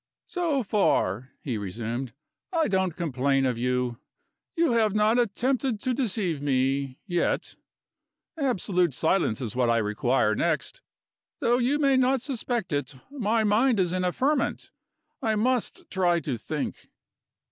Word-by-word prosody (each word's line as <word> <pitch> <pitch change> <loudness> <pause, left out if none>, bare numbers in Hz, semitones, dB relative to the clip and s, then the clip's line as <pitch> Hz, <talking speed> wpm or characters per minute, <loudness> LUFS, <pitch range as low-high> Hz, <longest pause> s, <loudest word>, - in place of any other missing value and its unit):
"So 330 -7 -1
far," 130 - +1
he 120 -7 -2
resumed, 115 +5 -4 0.4
"I 330 -3 +2
don't 190 -4 0
complain 135 -5 +1
of 125 -3 0
you. 125 -1 -1 0.6
You 335 -4 +2
have 220 -3 +2
not 215 +3 +3
attempted 245 +1 0
to 255 - 0
deceive 205 - -1
me 135 -1 0
yet. 175 -4 -1 0.8
Absolute 185 - +1
silence 160 - +1
is 120 -1 -4
what 125 -2 +2
I 115 - +3
require 110 +1 +1
next. - - -1 0.6
Though 240 +1 +2
you 260 +4 +2
may 275 -3 +3
not 260 +1 +3
suspect 235 - -3
it, 145 -1 -2 0.2
my 230 -5 +1
mind 220 +2 +3
is 180 -2 +1
in 185 0 0
a 180 - +1
ferment; 275 +7 0 0.5
I 220 -1 +1
must 245 +2 -1
try 175 -3 +2
to 140 -5 -2
think." 115 - -5
185 Hz, 140 wpm, -26 LUFS, -, 0.8 s, not